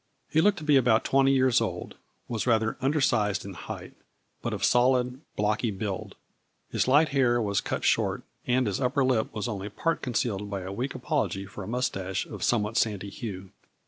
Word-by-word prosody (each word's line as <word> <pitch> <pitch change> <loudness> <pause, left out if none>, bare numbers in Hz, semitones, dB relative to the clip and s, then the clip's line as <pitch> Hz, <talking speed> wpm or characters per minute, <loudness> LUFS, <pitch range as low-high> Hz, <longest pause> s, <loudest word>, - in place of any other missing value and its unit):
He 160 - +4
looked 205 +3 +3
to 155 - -7
be 150 -2 +5
about 120 -3 +4
twenty 135 0 +4
years 130 -2 +4
old, - - -3 0.3
was 115 0 -3
rather 110 -2 +2
undersized 130 - +1
in 100 - -7
height, 85 - -8 0.5
but - - -2
of - - -4
solid, 125 +1 +2
blocky 105 +3 +1
build. 100 -1 -4 0.6
His - - +1
light 145 +4 +5
hair 125 -3 +3
was 100 -3 0
cut - - -3
short, - - +1 0.2
and 125 +1 +2
his 105 +3 -1
upper 135 +2 +2
lip 125 -4 +1
was 105 -1 -3
only 105 -3 -4
part 165 +10 -1
concealed 110 -5 -1
by 100 -2 -3
a 95 +1 -6
weak 125 +6 -3
apology 130 -7 -1
for 100 +1 -8
a - - -8
mustache 95 -6 -2
of - - -9
somewhat 110 -1 +1
sandy 100 -2 0
hue. 95 -5 -7
120 Hz, 185 wpm, -27 LUFS, 100-130 Hz, 0.6 s, be